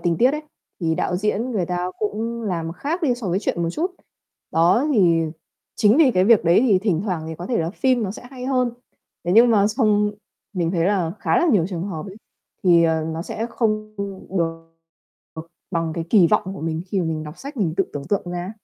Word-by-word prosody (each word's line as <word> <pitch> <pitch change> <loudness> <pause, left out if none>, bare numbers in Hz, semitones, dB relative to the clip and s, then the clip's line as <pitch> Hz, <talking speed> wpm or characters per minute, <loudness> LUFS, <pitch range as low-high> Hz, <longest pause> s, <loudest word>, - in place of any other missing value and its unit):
tình 170 -1 0
tiết 250 +2 +5
ấy, 300 +1 -3 0.4
thì 165 -2 +1
đạo 180 - -1
diễn 210 +5 -1
người 190 -6 0
ta 180 +1 -2
cũng 225 +2 -3
làm 170 -5 -2
khác 315 - -3
đi 255 -6 +2
so 235 -6 -5
với 180 - +1
truyện 175 -4 -2
một 165 - 0
chút. 340 - -2 0.6
Đó, 175 - +3
thì 170 -6 +4 0.5
chính 215 +1 +4
vì 305 -5 +6
cái 185 -5 +2
việc 220 -2 +5
đấy 170 +4 +5
thì 195 -4 +5
thỉnh 185 -5 0
thoảng 180 -6 -2
thì 160 - -5
có 175 +3 -7
thể 235 - 0
là 165 +1 -1
phim 255 +2 +1
nó 200 - -2
sẽ 205 - -9
hay 255 -2 -8
hơn. 255 -2 +1 0.5
Thế 175 - 0
nhưng 235 +2 +7
mà 205 -3 +4
xong 210 -2 +2 0.4
mình 175 -4 -1
thấy 170 -3 0
là 180 -4 +1
khá - - +2
là 350 - +2
nhiều 175 -6 +3
trường 175 -4 -4
hợp 165 0 -5
ấy, 195 - -10 0.5
thì, 170 -3 +5
ờ, 160 -1 +1
nó 165 +1 -4
sẽ 220 +5 -4
không 215 -2 -1 0.4
được, 165 -1 -3 0.6
ờ, 160 - -6 0.3
bằng 165 -2 -1
cái 165 - -3
kỳ 195 -6 +6
vọng 190 +3 +1
của - - -8
mình 160 +1 -2
khi 195 +1 -2
mà - - -1
mình 155 -1 -2
đọc 150 +2 -10
sách 280 +1 -8
mình 175 -8 0
tự 195 - +2
tưởng 140 -1 -5
tượng 200 - +1
ra 175 0 -3
ấy. 185 - -6
190 Hz, 235 wpm, -22 LUFS, 170-225 Hz, 0.6 s, nhưng